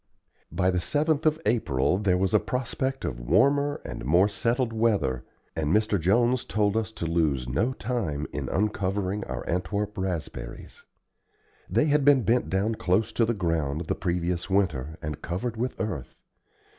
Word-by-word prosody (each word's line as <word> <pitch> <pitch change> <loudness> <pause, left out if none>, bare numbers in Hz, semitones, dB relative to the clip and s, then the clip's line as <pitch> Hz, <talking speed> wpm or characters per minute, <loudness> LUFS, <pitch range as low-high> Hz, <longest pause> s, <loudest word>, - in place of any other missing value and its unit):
By 95 -1 +2
the 90 - 0
7th 155 - +1
of 155 +1 +2
April 90 - +1
there 95 -3 +2
was 95 0 0
a - - +6
prospect 130 +1 -2
of - - -3
warmer 140 - +2
and - - -6
more 85 +9 +4
settled 115 +4 0
weather, 100 - +1 0.3
and 80 -2 -1
Mr. 105 0 +2
Jones 120 +8 +2
told 105 -1 0
us 110 -1 -1
to 85 - -4
lose 80 -7 +1
no 100 - 0
time 105 - -2
in - - -3
uncovering 100 -1 -1
our - - -5
Antwerp 100 +4 -2
raspberries. 85 -10 -5 0.8
They 115 - +3
had 150 -1 +3
been 140 -3 +5
bent 120 +3 +2
down 100 +4 +1
close 105 +2 0
to 115 - +3
the 120 +1 0
ground 80 -5 -1
the - - 0
previous 90 0 -2
winter 80 -6 0
and 75 -1 -4
covered 105 +7 -3
with 125 +3 -3
earth. 95 - -5
100 Hz, 160 wpm, -27 LUFS, 85-115 Hz, 0.8 s, a